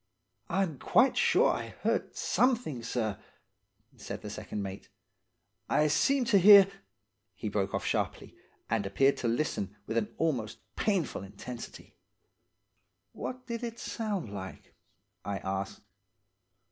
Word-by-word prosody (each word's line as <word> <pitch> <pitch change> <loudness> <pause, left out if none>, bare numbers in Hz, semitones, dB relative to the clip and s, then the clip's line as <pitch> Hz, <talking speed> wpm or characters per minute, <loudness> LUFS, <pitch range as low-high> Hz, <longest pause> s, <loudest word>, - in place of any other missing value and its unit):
"'I'm 175 -6 0
quite 250 +8 +4
sure - - +4
I - - -4
heard - - 0
something, 240 - +1
sir,' 115 -3 -2 0.8
said - - -7
the - - -6
second 105 - -5
mate. 95 0 -7 0.8
'I 150 0 +3
seemed 270 - +3
to 200 - +6
hear 200 +1 +10 0.3
— 100 +2 -51
' 100 -1 -51
He 105 - -4
broke 100 -1 -1
off - - -2
sharply, - - -2 0.3
and 105 -3 0
appeared 135 +8 +3
to 120 - -2
listen 115 -5 -1
with 110 - -2
an 110 -2 0
almost 120 -9 -1 0.2
painful 195 -7 0
intensity. 105 +5 -9 1.2
"'What 255 0 -6
did 235 -2 -4
it 230 -1 -4
sound 205 - -3
like?' 95 -1 -8 0.5
I 100 0 -3
asked. 95 0 -4
120 Hz, 135 wpm, -30 LUFS, -, 1.2 s, hear